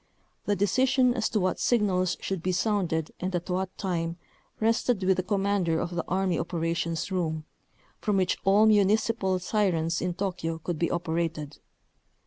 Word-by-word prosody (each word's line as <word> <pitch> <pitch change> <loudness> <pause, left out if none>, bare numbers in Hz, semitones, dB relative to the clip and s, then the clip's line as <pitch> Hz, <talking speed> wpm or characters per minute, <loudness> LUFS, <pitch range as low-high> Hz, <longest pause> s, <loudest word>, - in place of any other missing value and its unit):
The 205 - +1
decision 255 +6 +3
as 230 -3 -1
to 215 - 0
what 185 -1 0
signals 190 -6 +1
should 190 -3 -3
be 185 - 0
sounded 180 -5 0
and 185 0 -2
at 175 +1 -3
what 185 +1 -2
time 170 -3 -2 0.4
rested 225 -1 +1
with 185 0 +3
the - - +2
commander 195 -4 0
of 170 - -3
the 170 -1 -1
Army 185 -1 0
operations 165 +1 -2
room, 160 -4 -1 0.5
from 210 -2 0
which 185 -1 +1
all 200 +3 +5
municipal 210 -1 +3
sirens 180 -4 0
in 180 -1 -2
Tokyo 180 -4 -2
could 165 0 -4
be 170 - +1
operated. 160 -3 -2
185 Hz, 155 wpm, -27 LUFS, 170-205 Hz, 0.5 s, all